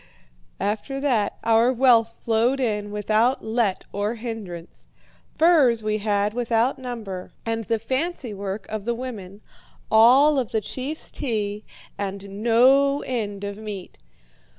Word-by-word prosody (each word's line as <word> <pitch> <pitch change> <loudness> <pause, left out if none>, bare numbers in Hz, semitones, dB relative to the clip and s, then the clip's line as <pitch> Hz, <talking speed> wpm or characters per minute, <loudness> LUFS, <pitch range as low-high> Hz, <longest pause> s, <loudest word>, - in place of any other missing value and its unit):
"After 215 +7 -2
that 245 -8 0
our 230 +2 +4
wealth 235 -3 +4
flowed 235 +4 +1
in 210 -5 -1
without 215 +4 +1
let 220 -4 0
or 205 +3 -2
hindrance. 215 -7 -8 0.5
Furs 300 -9 +4
we 215 0 0
had 205 0 0
without 235 +1 +1
number, 220 -8 -6
and 225 -1 -2
the 230 +1 0
fancy 260 +2 -3
work 200 0 -5
of 215 -1 -5
the 235 0 0
women, 215 -6 -7 0.5
all 265 +7 +6
of 245 - -2
the 220 - 0
chief's 270 +8 -5
tea, 210 -5 -3 0.3
and 200 0 -5
no 270 +5 +4
end 205 -5 -3
of 200 0 -5
meat. 205 - -8
225 Hz, 130 wpm, -23 LUFS, 205-250 Hz, 0.5 s, all